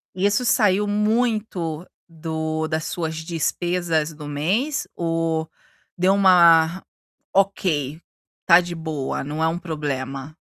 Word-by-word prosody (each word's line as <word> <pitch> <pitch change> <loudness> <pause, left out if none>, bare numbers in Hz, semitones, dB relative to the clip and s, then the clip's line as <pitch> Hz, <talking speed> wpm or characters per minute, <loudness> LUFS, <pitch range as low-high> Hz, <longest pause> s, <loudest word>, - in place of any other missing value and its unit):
Isso 200 +5 +1
saiu 210 -4 +2
muito 210 -6 -1 0.2
do 160 -1 -3
das 155 0 -2
suas 160 -2 -3
despesas 165 -1 -1
do 150 -1 -9
mês 195 - -1
ou 165 -1 -1 0.5
deu 185 +2 +3
uma: 175 -2 +5 0.5
"Ok, 170 -7 0 0.4
tá 170 -1 +7
de 175 -1 -4
boa, 160 -4 -4
não 150 +3 -3
é - - +3
um 165 +2 -2
problema."? 145 -4 -5
165 Hz, 115 wpm, -22 LUFS, 155-190 Hz, 0.5 s, tá